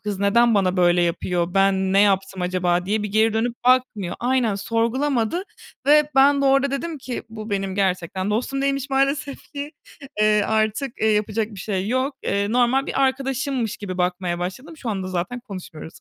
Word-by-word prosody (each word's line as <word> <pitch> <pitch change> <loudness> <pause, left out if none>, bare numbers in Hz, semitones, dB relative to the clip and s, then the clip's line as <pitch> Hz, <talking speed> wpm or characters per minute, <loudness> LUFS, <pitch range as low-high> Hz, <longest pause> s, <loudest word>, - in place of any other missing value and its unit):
kız 205 -2 -4
neden 230 +4 +3
bana 190 -2 +2
böyle 175 -1 +4
yapıyor? 175 +1 -1
Ben 195 -1 +2
ne 195 - +5
yaptım 195 -2 +1
acaba?" 180 0 0
diye 215 +1 0
bir 210 - -3
geri 220 +2 +2
dönüp 230 +2 0
bakmıyor. 245 -7 +2
Aynen, 245 -3 +1
sorgulamadı 235 - 0 0.4
ve 300 0 +5
ben 280 +1 +5
de - - +1
orada 275 0 +3
dedim 305 +3 -4
ki, 255 -2 -5
"Bu 220 -1 -8
benim 195 -1 -2
gerçekten 185 0 -1
dostum 260 +5 -1
değilmiş 275 0 -1
maalesef 275 +1 -1
ki. 290 +1 -6 0.5
Eee, 215 0 +4
artık, 220 +5 0
eee, 220 - +3
yapacak 215 +1 0
bir 200 -4 -9
şey 195 -1 -2
yok." 260 +4 0
Eee, 200 +1 -1
normal 250 +3 +2
bir 275 - 0
arkadaşımmış 265 -3 -1
gibi 185 -3 -6
bakmaya 180 -1 -1
başladım. 255 - -6
Şu 250 -6 -4
anda 190 -3 -3
zaten 185 +7 -3
konuşmuyoruz. 185 -8 -10
215 Hz, 175 wpm, -22 LUFS, 190-260 Hz, 0.5 s, ne